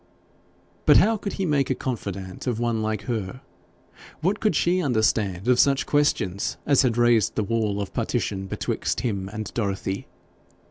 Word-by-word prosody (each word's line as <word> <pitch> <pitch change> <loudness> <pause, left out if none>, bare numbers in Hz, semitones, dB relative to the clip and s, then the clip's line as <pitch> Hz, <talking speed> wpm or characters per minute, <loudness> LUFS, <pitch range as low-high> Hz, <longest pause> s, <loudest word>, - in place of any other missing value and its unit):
But - - +8
how 225 +1 +4
could 205 -1 -5
he 195 - -2
make 145 -4 +1
a - - +1
confidante 100 -5 -5
of 120 -3 -1
one 120 -2 0
like 110 -1 -2
her? 115 0 -4 0.8
What 190 +6 +1
could 215 - +1
she 180 +2 +2
understand 110 - 0
of 125 -1 +4
such 140 -1 +3
questions 110 -10 0
as 140 -2 +4
had 120 -3 +1
raised 120 -3 +3
the 110 - 0
wall 105 -1 -1
of 100 - -4
partition 95 -1 -2
betwixt - - -2
him 100 -6 -2
and 110 0 -6
Dorothy? 100 -3 -2
115 Hz, 160 wpm, -24 LUFS, 100-135 Hz, 0.8 s, But